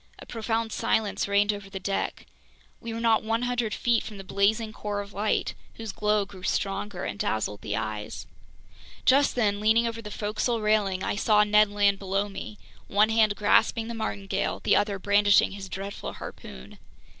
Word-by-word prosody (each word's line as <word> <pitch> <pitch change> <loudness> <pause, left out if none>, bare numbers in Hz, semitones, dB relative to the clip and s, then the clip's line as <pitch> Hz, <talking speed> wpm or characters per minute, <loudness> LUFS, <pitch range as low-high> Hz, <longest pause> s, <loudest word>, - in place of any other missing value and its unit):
A - - -11
profound 225 0 -2
silence 210 -2 0
reigned 205 +1 +3
over 200 -1 -8
the 195 -1 -6
deck. 195 +1 -3 0.5
We 230 - -6
were 225 - -4
not 230 -1 +3
100 230 +1 -1
feet 235 +2 +1
from 215 -2 -8
the 195 - -8
blazing 215 +3 +1
core 205 -1 -4
of 200 0 -7
light, 210 +2 0 0.2
whose 225 -2 -6
glow 210 0 +1
grew 195 -2 -13
stronger 195 0 -2
and 100 0 -5
dazzled 105 -2 -1
the 105 - -3
eyes. 110 -1 -4 0.8
Just 275 +2 +4
then, 205 -4 +1
leaning 220 +2 +3
over 230 0 -3
the 210 - -8
forecastle 215 +3 -1
railing, 210 -3 +1
I - - -1
saw 210 0 +4
Ned 210 0 +4
Land 205 -1 +2
below 195 +1 -1
me, 210 +1 -8 0.3
one 210 +2 +3
hand 220 -2 +3
grasping 225 +2 +2
the - - -3
martingale, 205 -3 -2
the - - +4
other 205 -1 +1
brandishing 205 +1 +4
his 195 -1 -8
dreadful 195 +2 -6
harpoon. 65 -1 -10
210 Hz, 175 wpm, -27 LUFS, 200-220 Hz, 0.8 s, Just